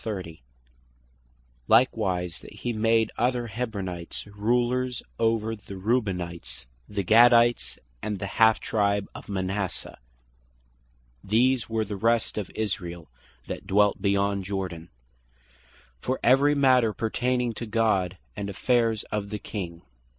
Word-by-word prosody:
that - - -3
hee 120 - -4
made 110 0 +2
other 120 0 +1
Hebronites, 100 -7 -4
"rulers 125 +3 0 0.2
over 115 -1 +1
the 100 -2 -10
Reubenites, 90 - -2 0.2
the 100 -1 -2
Gadites, 120 +4 +5 0.2
and 105 -1 -3
the 100 - -4
halfe 110 +3 +4
tribe 100 -2 0
of - - -11
Manasseh" 95 0 -3 1.2
(these 120 +4 +2
were 110 -1 0
the 105 0 -5
rest 115 +1 +1
of 100 - -5
Israel 90 - -4 0.4
that - - -6
dwelt 105 0 +3
beyond 100 0 +1
Jordan) 90 -4 -4 1.1
"for 130 - -2
every 140 +4 +5
matter 130 -5 +4
pertaining 125 +3 0
to 115 +2 -6
God, 105 -5 +1 0.2
and 100 -1 -4
affairs 115 +1 +1
of 100 -1 -2
the 105 - -3
King." 85 -5 -6
105 Hz, 115 wpm, -26 LUFS, 90-115 Hz, 1.2 s, Gadites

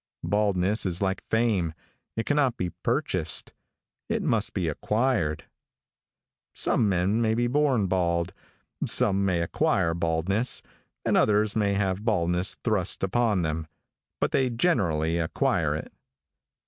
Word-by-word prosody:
Baldness 105 0 +1
is 90 -1 0
like 95 0 -1
fame, 105 -8 +1 0.4
it 115 - -2
cannot 145 -5 +1
be 90 -1 -2
purchased. - - 0 0.6
It - - -1
must - - 0
be 90 - 0
acquired. 105 - 0 1.1
Some 110 - +3
men 95 +4 +1
may 110 -1 +2
be 120 +1 +1
born 130 -4 +2
bald, 85 -1 0 0.5
some 100 -1 +2
may 90 -3 +1
acquire 85 0 +1
baldness, 85 +8 0 0.4
and - - +2
others 105 0 +3
may 100 -2 +1
have 100 0 -1
baldness 90 -4 0
thrust 105 -6 -1
upon 105 -1 +1
them, 80 0 -2 0.5
but - - 0
they 130 -2 +2
generally 85 - +1
acquire 80 - 0
it. - - -7
100 Hz, 125 wpm, -26 LUFS, 85-110 Hz, 1.1 s, Some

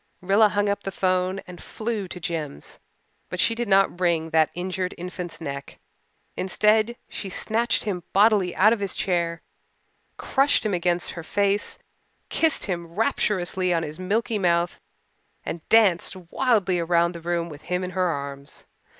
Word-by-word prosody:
Rilla 200 +4 +4
hung 205 0 0
up 200 0 0
the - - -4
'phone 185 +1 0
and 180 0 -11
flew 215 -3 -4
to 180 - -8
Jims. 155 - -5 0.5
But 180 - -5
she 230 - +3
did 235 0 -3
not 195 -2 +3
wring 165 -3 +1
that 160 -1 +4
injured 185 +1 -3
infant's 180 0 -6
neck. 140 -3 -6 0.6
Instead 215 +4 +2
she 195 - -6
snatched 230 +5 0
him 195 -5 -2
bodily 200 -3 +4
out 215 +4 +5
of 230 - -2
his 200 -2 -3
chair, 170 -3 -1 0.7
crushed 275 -3 +2
him 210 - 0
against 175 0 0
her 170 - -7
face, 200 +3 0 0.5
kissed 320 -2 +2
him 170 -3 -3
rapturously 185 -1 0
on 165 - 0
his 155 +2 -7
milky 215 +4 0
mouth, 175 -2 +1 0.6
and 165 - -4
danced 200 -6 +4
wildly 190 0 +1
around 170 +1 +2
the 170 - -8
room 170 0 -1
with 150 -3 -10
him 180 +1 0
in 180 - -4
her 185 0 +1
arms. 140 -3 -6
185 Hz, 160 wpm, -24 LUFS, 170-205 Hz, 0.7 s, out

